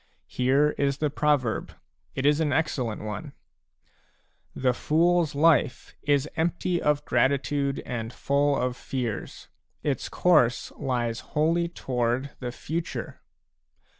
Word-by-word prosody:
Here 135 Hz, +4 st, +2 dB
is 140 Hz, -1 st, +1 dB
the 150 Hz, -1 st, 0 dB
proverb; 145 Hz, -6 st, 0 dB, 0.4 s
it 130 Hz, -, -2 dB
is 145 Hz, +1 st, +4 dB
an 155 Hz, -3 st, +1 dB
excel 145 Hz, -3 st, 0 dB
lent 110 Hz, -1 st, -5 dB
one: 105 Hz, -2 st, -6 dB, 0.6 s
" -, -, -40 dB
The 125 Hz, -, +6 dB
foors 165 Hz, +3 st, +2 dB
life 150 Hz, -2 st, +2 dB
is 145 Hz, 0 st, +2 dB
empty 170 Hz, +2 st, 0 dB
of 150 Hz, 0 st, +1 dB
gratitude 140 Hz, +2 st, +1 dB
and 115 Hz, -2 st, -4 dB
full 140 Hz, +2 st, +1 dB
of 125 Hz, 0 st, -1 dB
fears; 120 Hz, -6 st, -5 dB, 0.4 s
its 140 Hz, -3 st, -1 dB
course 125 Hz, -9 st, +3 dB
lies 120 Hz, -3 st, -2 dB
wholly 165 Hz, +3 st, +1 dB
toward 130 Hz, -4 st, -2 dB
the 125 Hz, -2 st, -4 dB
future." 165 Hz, +6 st, -5 dB
140 Hz, 125 wpm, -26 LUFS, 125-155 Hz, 0.6 s, The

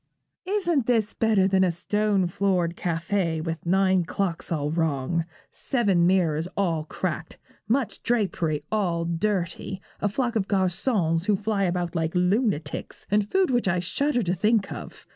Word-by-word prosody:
'Isn't 345 Hz, -, +1 dB
this 225 Hz, -3 st, +1 dB
better 215 Hz, -4 st, +3 dB
than 190 Hz, -1 st, +3 dB
a 185 Hz, -, +3 dB
stone 205 Hz, +2 st, 0 dB
floored 175 Hz, -1 st, 0 dB
café 170 Hz, 0 st, -1 dB
with 165 Hz, 0 st, -5 dB
nine 190 Hz, 0 st, +3 dB
clocks 180 Hz, -1 st, -3 dB
all 150 Hz, -2 st, -1 dB
wrong, 160 Hz, 0 st, 0 dB, 0.3 s
seven 200 Hz, -10 st, +1 dB
mirrors 170 Hz, -4 st, +2 dB
all 165 Hz, -6 st, 0 dB
cracked, 160 Hz, -1 st, -4 dB, 0.3 s
much 245 Hz, 0 st, 0 dB
drapery 170 Hz, -10 st, 0 dB
all 175 Hz, -6 st, 0 dB
dirty, 180 Hz, +1 st, -2 dB, 0.2 s
a 205 Hz, -, +1 dB
flock 235 Hz, +2 st, -1 dB
of 200 Hz, -3 st, 0 dB
garçons 185 Hz, -2 st, +1 dB
who 210 Hz, -, +4 dB
fly 205 Hz, 0 st, 0 dB
about 175 Hz, -1 st, -1 dB
like 165 Hz, +1 st, -1 dB
lunatics, 180 Hz, -, 0 dB
and 205 Hz, 0 st, +2 dB
food 380 Hz, -5 st, +2 dB
which 245 Hz, -4 st, +1 dB
I 180 Hz, -1 st, +2 dB
shudder 245 Hz, +8 st, 0 dB
to 180 Hz, -1 st, 0 dB
think 210 Hz, +3 st, +1 dB
of? -, -, -8 dB
190 Hz, 150 wpm, -25 LUFS, 170-210 Hz, 0.3 s, who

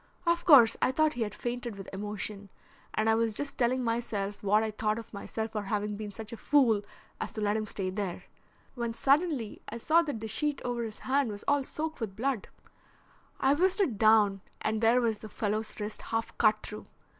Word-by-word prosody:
Of 340 Hz, 0 st, +1 dB
course 260 Hz, -10 st, +8 dB
I -, -, +3 dB
thought 310 Hz, +3 st, +2 dB
he 240 Hz, -, -5 dB
had 210 Hz, -2 st, -2 dB
fainted 240 Hz, -2 st, -4 dB
with 195 Hz, -1 st, -9 dB
emotion, 205 Hz, 0 st, -5 dB, 0.5 s
and 215 Hz, +1 st, +1 dB
I 220 Hz, -, +5 dB
was 225 Hz, -1 st, +1 dB
just 285 Hz, +3 st, -2 dB
telling 255 Hz, +1 st, +1 dB
myself 225 Hz, -4 st, -2 dB
what 210 Hz, +2 st, +3 dB
I 220 Hz, -, -1 dB
thought 215 Hz, 0 st, -1 dB
of 230 Hz, -1 st, -9 dB
myself 220 Hz, +2 st, -4 dB
for 215 Hz, -, -2 dB
having 205 Hz, +1 st, -2 dB
been 210 Hz, 0 st, -5 dB
such 220 Hz, +3 st, -8 dB
a -, -, -6 dB
fool 245 Hz, -8 st, +3 dB, 0.4 s
as -, -, -4 dB
to 215 Hz, -, -4 dB
let 205 Hz, 0 st, +1 dB
him 215 Hz, -1 st, -2 dB
stay 190 Hz, -2 st, -2 dB
there, 190 Hz, -3 st, -4 dB, 0.5 s
when 235 Hz, -2 st, -3 dB
suddenly 275 Hz, -4 st, +1 dB
I 230 Hz, -, -5 dB
saw 315 Hz, +8 st, +4 dB
that 290 Hz, -9 st, -3 dB
the 220 Hz, -, -5 dB
sheet 295 Hz, +5 st, -1 dB
over 245 Hz, -1 st, -1 dB
his 220 Hz, -2 st, -6 dB
hand 270 Hz, -1 st, +2 dB
was 205 Hz, -1 st, -6 dB
all 285 Hz, -1 st, +3 dB
soaked 315 Hz, +3 st, -4 dB
with 215 Hz, -5 st, -4 dB
blood; 250 Hz, 0 st, -1 dB, 0.9 s
I 270 Hz, +1 st, +4 dB
whisked 370 Hz, +6 st, +2 dB
it 260 Hz, -, +1 dB
down, 215 Hz, -3 st, +5 dB, 0.2 s
and 220 Hz, 0 st, -1 dB
there 235 Hz, +2 st, +5 dB
was 225 Hz, -3 st, 0 dB
the 215 Hz, -, -9 dB
fellow's 215 Hz, +2 st, -2 dB
wrist 210 Hz, +1 st, -5 dB
half 225 Hz, 0 st, -3 dB
cut 215 Hz, -1 st, +4 dB
through. 210 Hz, -, -6 dB
225 Hz, 210 wpm, -30 LUFS, 210-255 Hz, 0.9 s, course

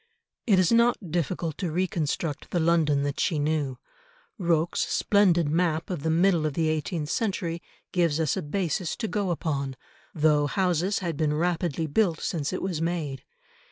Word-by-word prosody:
It 200 Hz, -4 st, +5 dB
is 185 Hz, -2 st, +3 dB
not 230 Hz, -6 st, +2 dB
difficult 170 Hz, -1 st, -2 dB
to 180 Hz, -5 st, -2 dB
reconstruct 160 Hz, -3 st, -2 dB
the 175 Hz, -, 0 dB
London 160 Hz, -4 st, +2 dB
that 145 Hz, -1 st, -2 dB
she 165 Hz, -, +1 dB
knew. 145 Hz, -3 st, -1 dB, 0.6 s
Rocque's 170 Hz, -2 st, +1 dB
splendid 180 Hz, -6 st, +3 dB
map 160 Hz, +2 st, 0 dB
of 175 Hz, -5 st, -3 dB
the 160 Hz, -, -1 dB
middle 170 Hz, -1 st, +3 dB
of 145 Hz, -, -4 dB
the 160 Hz, -1 st, +1 dB
eighteenth 155 Hz, 0 st, -2 dB
century 185 Hz, -7 st, -1 dB, 0.3 s
gives 170 Hz, -4 st, +1 dB
us 155 Hz, -4 st, +1 dB
a -, -, -2 dB
basis 170 Hz, +1 st, -2 dB
to 230 Hz, -, -3 dB
go 205 Hz, -2 st, -1 dB
upon, 140 Hz, -6 st, -2 dB, 0.4 s
though 150 Hz, -2 st, +3 dB
houses 185 Hz, +3 st, +1 dB
had 165 Hz, -4 st, -2 dB
been 150 Hz, -1 st, +1 dB
rapidly 165 Hz, -1 st, 0 dB
built 170 Hz, +2 st, +1 dB
since 155 Hz, -5 st, -2 dB
it 185 Hz, -, -3 dB
was 180 Hz, -4 st, -2 dB
made. 160 Hz, -6 st, -2 dB
165 Hz, 165 wpm, -26 LUFS, 150-180 Hz, 0.6 s, It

